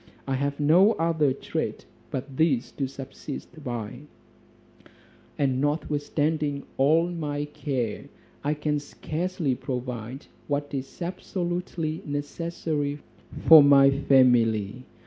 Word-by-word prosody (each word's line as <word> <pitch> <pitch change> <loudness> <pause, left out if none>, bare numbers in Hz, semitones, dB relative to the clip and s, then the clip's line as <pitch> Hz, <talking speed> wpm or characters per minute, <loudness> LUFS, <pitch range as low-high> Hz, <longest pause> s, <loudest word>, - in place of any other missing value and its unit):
I 135 - -2
have 140 +2 -1
no 175 +9 +5
other 160 -5 +1
trade 130 - -4 0.2
but 135 +1 -5
this 140 -7 +2
to 135 - -2
subsist 135 +3 -8
by: 120 -3 -5 1.4
and 135 -2 +1
notwithstanding 145 0 -1
all 155 +5 +4
my 145 -4 -3
care, 135 -6 -3 0.4
I 150 +2 0
can 150 0 -1
scarcely 160 0 -3
provide 125 -1 -5 0.2
what 145 0 -2
is 135 +5 -5
absolutely 175 -2 -3
necessary 145 0 -3 0.5
for 160 -2 +11
my 140 -1 +7
family. 125 -5 +3
145 Hz, 105 wpm, -26 LUFS, 135-155 Hz, 1.4 s, for